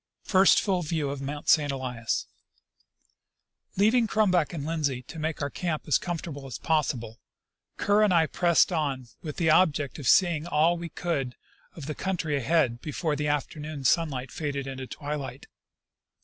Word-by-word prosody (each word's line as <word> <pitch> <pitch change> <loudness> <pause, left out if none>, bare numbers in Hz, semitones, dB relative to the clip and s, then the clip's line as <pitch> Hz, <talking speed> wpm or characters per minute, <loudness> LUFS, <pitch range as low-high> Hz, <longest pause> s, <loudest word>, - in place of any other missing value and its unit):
First 190 -1 +5
full 190 -3 0
View 155 -3 -2
of 140 -1 -5 0.3
St. 145 -2 +4
Elias. 125 -4 -2 1.5
Leaving 225 +4 +4
Crumback 185 -8 +2
and 155 -5 -5
Lindsley 145 -6 -1
to 160 - -9
make 155 -1 -2
our 140 - -2
camp 170 -4 -3
as 150 - +3
com 175 -2 -3
fortable 145 -4 -7
as 130 - -6
possible, 125 -8 -1 0.6
Kerr 205 +1 +3
and 210 -2 +4
I 165 -2 +4
pressed 175 +2 +3
on 140 -7 -2
with 155 -5 -6
the 160 -2 +3
object 155 -5 +2
of 135 - -4
seeing 170 -4 +4
all 165 +2 +3
we 170 0 -6
could 140 -8 -3 0.4
of 155 - -8
the 155 - -3
country 165 -4 -2
ahead 135 -3 +1
before 155 0 -2
the 150 +1 -2
afternoon 150 0 -3
sunlight 135 -5 +1
faded 140 -3 -3
into 130 -1 -6
twilight. 145 -3 -6
155 Hz, 160 wpm, -27 LUFS, 140-170 Hz, 1.5 s, First